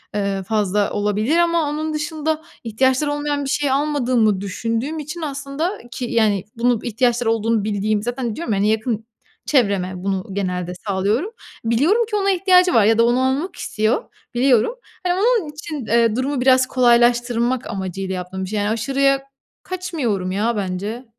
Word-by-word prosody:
ııı, 200 -1 -1
fazla 205 0 0
olabilir 210 +9 0
ama 335 -3 +2
onun 310 +1 -3
dışında 310 0 -2 0.2
ihtiyaçları 260 +6 +1
olmayan 290 -1 -1
bir - - -3
şey 285 -1 0
almadığımı 250 -8 +1
düşündüğüm 230 +9 -3
için 305 +3 -6
aslında 285 +4 -3 0.2
ki 245 +1 -4
yani, 215 -5 +1
bunu 240 -1 +2
ihtiyaçları 240 0 +1
olduğunu 225 -1 +1
bildiğim 210 0 0
zaten 245 -2 -3
diyorum 315 -10 -2
ya 195 - 0
hani, 205 - +2
yakın 220 0 -1 0.4
çevreme 200 -9 +1
bunu 190 -1 -1
genelde 180 -2 -2
sağlıyorum. 205 - 0 0.3
Biliyorum 320 - +3
ki 420 - -2
ona 395 -1 +2
ihtiyacı 365 -1 +4
var 215 -3 +5
ya 225 +1 +4
da 230 - +5
onu 240 +2 +2
almak 280 +8 0
istiyor, 215 +2 -1 0.3
biliyorum. 250 - +3 0.3
Hani, 355 - +3
onun 435 -5 +2
için, 300 -4 -6
eee, 230 -1 +3
durumu 260 +1 -1
biraz 255 0 +4
kolaylaştırmak 240 0 +2
amacıyla 190 0 -4
yaptığım 185 +1 -5
bir - - -8
şey. 210 -1 -1
Yani, 205 +1 0
aşırıya 275 +4 +1 0.4
kaçmıyorum 265 - -2
ya 220 +4 0
bence. 200 +6 -4
240 Hz, 160 wpm, -20 LUFS, 210-290 Hz, 0.4 s, var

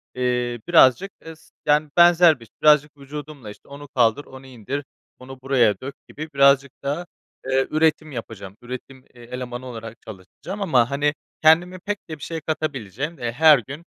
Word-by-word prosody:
eee, 125 -1 -1
birazcık 165 +2 +5
es 160 0 -13
yani 150 +1 +2
benzer 175 -3 +6
bir 115 - -14
iş, 105 - -26
birazcık 150 -1 +4
vücudumla, 145 -3 -9
işte, 105 - -14
onu 145 +1 -11
kaldır, 125 0 +1
onu 130 0 -13
indir, 130 +3 -6 0.4
onu 130 +1 -11
buraya 125 -6 +2
dök 140 +2 -7
gibi 155 +2 -8
birazcık 140 0 +4
daha, 145 +6 -3 0.4
eee, 135 0 +1
üretim 155 0 +1
yapacağım. 110 -6 -8
Üretim, 130 +1 -9
e 120 - -16
elemanı 125 +1 -7
olarak 115 -2 -8
çalışacağım 110 - -9
ama, 130 -11 +2
hani, 145 +1 +1 0.3
kendime 175 +4 +4
pek 205 -4 -5
de 155 - -6
bir - - -12
şey 165 -1 -5
katabileceğim, 150 - -4
eee, 120 -1 -3
her 150 +1 +6
gün 140 +8 -10
140 Hz, 165 wpm, -22 LUFS, 125-155 Hz, 0.4 s, benzer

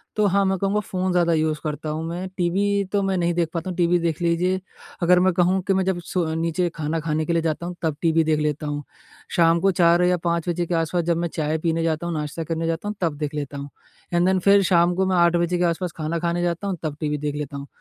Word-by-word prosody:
तो 210 - +2
हाँ, 200 +1 +3
मैं 190 0 +1
कहूँगा 200 +1 +1
फ़ोन 185 -2 -2
ज़्यादा 175 -1 +2
यूज़ 155 -1 0
करता 155 0 -4
हूँ 155 +1 -3
मैं। 175 +3 -4
टीवी 200 +3 +1
तो 205 - +1
मैं 195 -1 0
नहीं 175 -1 +1
देख 170 -1 0
पाता 170 +2 -3
हूँ, 180 - -4
टीवी 175 0 +3
देख 170 -1 -2
लीजिए 175 +2 +1 0.4
अगर 180 +1 +5
मैं 185 +1 +4
कहूँ 180 +2 +2
कि 195 - +3
मैं 190 0 +2
जब 190 -2 0
सो 180 -2 -1
नीचे 165 +2 0
खाना 160 +1 -2
खाने 155 0 -1
के 170 - 0
लिए 165 - +2
जाता 160 +1 -2
हूँ 180 - -5
तब 160 -3 0
टीवी 165 -1 +3
देख 155 -1 +1
लेता 150 0 -1
हूँ। 145 0 -3 0.5
शाम 170 0 +4
को 195 +1 +3
4 170 0 +4
या 180 0 +3
5 170 0 0
बजे 175 0 -1
के 175 - -3
आस-पास 165 +1 0
जब 170 0 +1
मैं 170 0 -1
चाय 155 0 0
पीने 165 0 0
जाता 160 0 -1
हूँ, 170 - -2
नाश्ता 150 +2 -3
करने 165 +1 -2
जाता 165 +5 -2
हूँ 210 - -3
तब 165 -4 0
देख 150 -1 -3
लेता 145 -1 -4
हूँ। 140 0 -6 0.4
एंड 175 +1 +3
देन 190 0 +3
फ़िर 200 +2 +5
शाम 175 -1 +3
को 190 +1 +1
मैं 185 -1 +1
8 170 0 +4
बजे 175 +1 +1
के 175 - +1
आस-पास 175 +1 0
खाना 160 +1 -2
खाने 170 +1 -1
जाता 175 +3 -1
हूँ 190 -2 -2
तब 150 -2 -3
टीवी 150 -1 -1
देख 145 0 -3
लेता 145 -1 -5
हूँ। 140 0 -8
170 Hz, 270 wpm, -23 LUFS, 160-180 Hz, 0.5 s, अगर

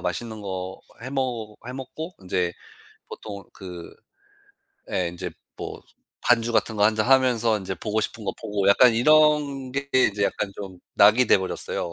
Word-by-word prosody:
맛있는 110 +5 -4
거 95 -2 -5 0.2
해먹 125 -5 -3
해먹고 135 +7 -7
인제 90 -1 -1 0.6
보통 100 -2 -8
그 90 -3 -9 1.0
예 90 -2 0
인제 90 +1 -6 0.3
뭐 - - -7 0.4
반주 120 -1 +3
같은 110 0 +1
거 105 - +1
1 110 0 +3
잔 110 - +1
하면서 125 -4 +4
인제 95 -1 -5
보고 110 0 -1
싶은 110 0 -4
거 - - -1
보고 100 -2 -1
약간 120 +4 +7
이런 145 0 +3
게 140 +1 -3
인제 105 -6 +3
약간 100 - -1
좀 95 -3 -8 0.2
낙이 110 +5 +6
돼버렸어요. 95 -2 0
110 Hz, 265 characters per minute, -24 LUFS, 95-130 Hz, 1.0 s, 약간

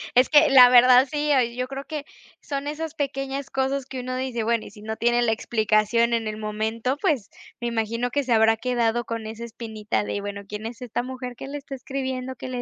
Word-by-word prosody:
es 250 +1 +5
que, 300 0 +6
la 255 -2 +9
verdad 250 +1 +7
sí, 295 0 0
oye, 240 -3 +2
yo 250 +1 -2
creo 270 +1 -6
que 300 -3 -5 0.4
son 280 -1 -4
esas 310 +1 -4
pequeñas 275 -1 -3
cosas 270 0 -1
que 265 -1 -6
uno 255 0 -4
dice 255 -3 -2
bueno, 230 0 0
y - - -11
si 210 0 -14
no 220 0 -4
tiene 240 +1 +2
la 230 - +2
explicación 220 +1 +1
en 225 -1 0
el 215 0 -4
momento, 220 +4 -2
pues, 245 -9 0 0.3
me 240 - -1
imagino 230 +1 -1
que 285 +2 0
se 255 - -4
habrá 225 0 +5
quedado 240 0 0
con 230 -1 -5
esa 220 +1 -7
espinita 220 -3 -3
de: 205 - -3
"Bueno, 200 0 -6
¿quién 210 +2 -6
es 230 0 -9
esta 240 -1 -2
mujer 255 -1 -6
que 260 - -8
le 285 +1 -5
está 280 -1 -9
escribiendo 260 -1 -4
que 255 - -7
le 250 -1 -3
245 Hz, 230 wpm, -24 LUFS, 225-270 Hz, 0.4 s, la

